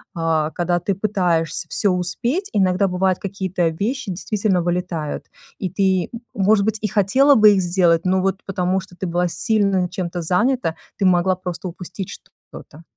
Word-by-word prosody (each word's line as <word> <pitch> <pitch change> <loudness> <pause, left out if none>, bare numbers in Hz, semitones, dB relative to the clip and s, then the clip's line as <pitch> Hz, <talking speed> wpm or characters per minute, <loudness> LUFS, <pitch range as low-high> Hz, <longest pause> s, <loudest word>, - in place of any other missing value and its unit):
а, 160 -2 0
когда 175 0 0
ты 195 +3 -1
пытаешься 180 -5 0
всё 205 - +1
успеть, 235 - -1
иногда 190 -1 +2
бывает 185 0 0
какие-то 190 -3 -2
вещи 210 +10 -2
действительно 195 0 0
вылетают. 175 -3 -3 0.3
И 190 - -2
ты, 190 -1 +1 0.2
может 205 -1 +3
быть, 220 0 +1
и 215 - 0
хотела 260 +9 +4
бы 215 -2 +7
их 195 - +2
сделать, 175 -2 +2
но 185 0 +2
вот 195 +1 -1
потому 185 0 0
что 185 -1 -12
ты 185 - -4
была 175 +1 0
сильно 195 0 +1
чем-то 175 -1 -4
занята, 180 +2 +1 0.2
ты 195 - 0
могла 185 0 +3
просто 180 0 -5
упустить 180 +2 -7 0.4
что-то. 155 +3 -12
185 Hz, 160 wpm, -21 LUFS, 175-200 Hz, 0.4 s, бы